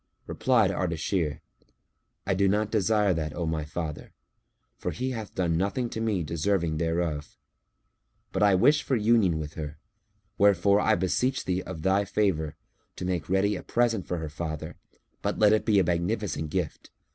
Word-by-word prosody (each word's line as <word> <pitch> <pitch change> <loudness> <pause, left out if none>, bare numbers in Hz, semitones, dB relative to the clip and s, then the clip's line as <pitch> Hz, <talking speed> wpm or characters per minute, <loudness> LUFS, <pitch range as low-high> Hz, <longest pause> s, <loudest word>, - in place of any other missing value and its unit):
Replied 115 -7 +2
Ardashir, 85 -3 -1 0.8
"I 95 - +1
do 100 +1 +2
not 105 +2 +1
desire 105 -1 +2
that, 80 -2 -3
O 85 - -2
my 80 -2 -2
father, 80 0 -6 0.7
for - - -2
he 130 +11 -3
hath 110 -4 -6
done 85 -3 +1
nothing 100 +7 -1
to 110 - -4
me 105 -6 0
deserving 85 +1 0
thereof; 80 -3 -2 0.9
but - - -2
I 100 -2 +5
wish 145 +11 +4
for 135 - 0
union 110 -6 +3
with 75 0 -5
her; 75 -1 -6 0.6
wherefore 100 0 +4
I - - +3
beseech 125 +9 0
thee 90 0 0
of 85 -5 -7
thy 95 +2 +3
favour 85 -7 0 0.4
to - - -5
make 90 -4 -2
ready 100 +2 +2
a 90 - -5
present 115 -8 0
for 90 - -2
her 80 -2 -4
father 80 0 -5 0.5
(but - - -1
let 105 -1 +5
it 110 - +1
be 110 -3 +3
a 95 - +5
magnificent 85 0 -1
gift!) - - -3
95 Hz, 170 wpm, -27 LUFS, 80-105 Hz, 0.9 s, I